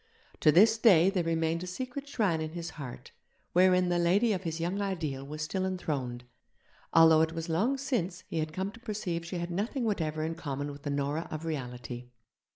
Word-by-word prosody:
To 155 - +6
this 220 +7 +6
day 190 -5 +6
there 185 -3 0
remained 165 0 0
a 180 - -5
secret 255 +8 -5
shrine 205 - 0
in 155 0 -4
his 170 -1 -5
heart 135 -5 -9 0.4
wherein 180 0 +5
the 175 0 +2
Lady 200 +7 +3
of 185 - -2
his 165 -3 -4
young 180 +5 -1
ideal 160 -9 -2
was 150 +2 -5
still 185 +5 -2
enthroned, 140 -10 -3 0.7
although 160 -1 +7
it 160 0 +1
was 165 +1 -5
long 215 +12 +1
since 195 -10 -2
he 165 - -2
had 155 0 -2
come 190 +5 -3
to 230 - -14
perceive 205 -7 -3
she 175 +2 -5
had 170 0 -3
nothing 215 +8 -2
whatever 160 -8 -1
in 160 +1 -1
common 145 -3 -4
with 145 0 -10
the 145 - -4
Nora 145 +3 -1
of 155 +1 -5
reality. 125 -4 -5
170 Hz, 200 wpm, -30 LUFS, 155-190 Hz, 0.7 s, although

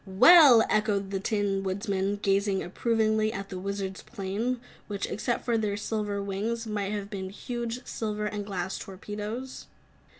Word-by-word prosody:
"Well!" 250 - +8
echoed 205 -2 +1
the 195 - -1
Tin 200 -1 0
Woodman, 195 +1 -1
gazing 195 0 +2
approvingly 220 +2 +1
at 195 -1 -6
the 185 - -5
Wizard's 195 0 -4
planes, 220 +3 -2 0.3
which, 200 -1 -3
except 240 +3 -2
for 235 -2 +2
their 205 -2 -1
silver 205 -1 -2
wings, 215 +4 -2
might 205 -2 -2
have 205 -1 -4
been 190 -2 -4
huge, 240 +4 -5
silver 210 -1 -3
and 210 0 -3
glass 190 -2 -3
torpedoes. 210 +6 -6
205 Hz, 145 wpm, -28 LUFS, 195-220 Hz, 0.3 s, Well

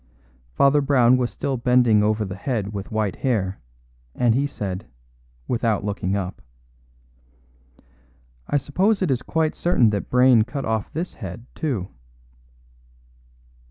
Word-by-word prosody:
Father 140 - +4
Brown 130 -3 +4
was 125 -2 0
still 135 -2 -3
bending 120 -3 +4
over 105 +1 +1
the 95 -1 -6
head 105 -1 -3
with 100 -1 -5
white 110 -3 -1
hair, 100 -8 -1 0.6
and 120 -2 +3
he 140 +4 +1
said, 100 -5 -5 0.6
without 115 -4 0
looking 100 -2 -2
up: 95 -2 -4 2.1
"I 145 - +1
suppose 190 +9 +1
it 170 - +1
is 130 -1 0
quite 160 +2 0
certain 125 -11 +2
that 100 -2 -3
Brayne 125 -2 +5
cut 130 +4 -5
off 110 -2 -2
this 170 +4 -4
head, 105 +2 -8
too." 120 - -3
120 Hz, 130 wpm, -23 LUFS, 105-135 Hz, 2.1 s, Brayne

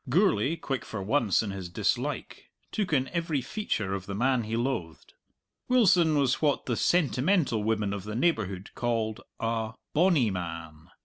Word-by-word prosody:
Gourlay, 155 - +3
quick 135 -5 -3
for 100 -3 -5
once 110 -1 +2
in 105 - -3
his 95 -3 -6
dislike, 85 - -2 0.2
took 205 -5 -1
in 135 -3 +2
every 165 -4 -1
feature 125 - -2
of 95 -1 -4
the 100 - -4
man 125 +1 +1
he 110 +1 -2
loathed. 115 -10 -3 0.6
Wilson 180 -11 +4
was 135 -3 +2
what 145 -3 +1
the 120 - 0
sentimental 150 - +2
women 105 -2 0
of 100 -2 -4
the 105 +1 -5
neighbourhood 110 - 0
called 115 -3 -1 0.2
a 115 -1 -1 0.2
"bonny 155 - +3
man." 85 -2 -6
115 Hz, 160 wpm, -28 LUFS, 100-150 Hz, 0.6 s, Wilson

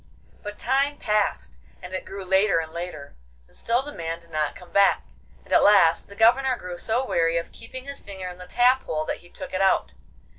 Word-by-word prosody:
But 205 0 -7
time 275 +3 +1
passed, 210 - -1 0.2
and 180 +1 -10
it 185 - -4
grew 195 -1 -7
later 190 0 +3
and 160 -1 -3
later, 170 -5 -7 0.3
and - - -17
still 240 +3 0
the 295 - -7
man 165 0 -4
did 170 0 -20
not 155 -2 -1
come 180 - -14
back, 200 0 +4 0.4
and - - -5
at - - +6
last 190 -5 +5
the 200 - -12
Governor 250 +4 +4
grew 180 -1 -7
so 240 +4 0
weary 165 -6 +1
of 170 - -4
keeping 255 +3 -9
his 280 0 -6
finger 190 -2 -7
in 180 0 -9
the 180 - -10
tap 250 +2 +3
hole 155 0 -2
that - - -3
he 175 - -18
took - - -8
it 185 - 0
out. 195 - +2
190 Hz, 220 wpm, -25 LUFS, 170-230 Hz, 0.4 s, at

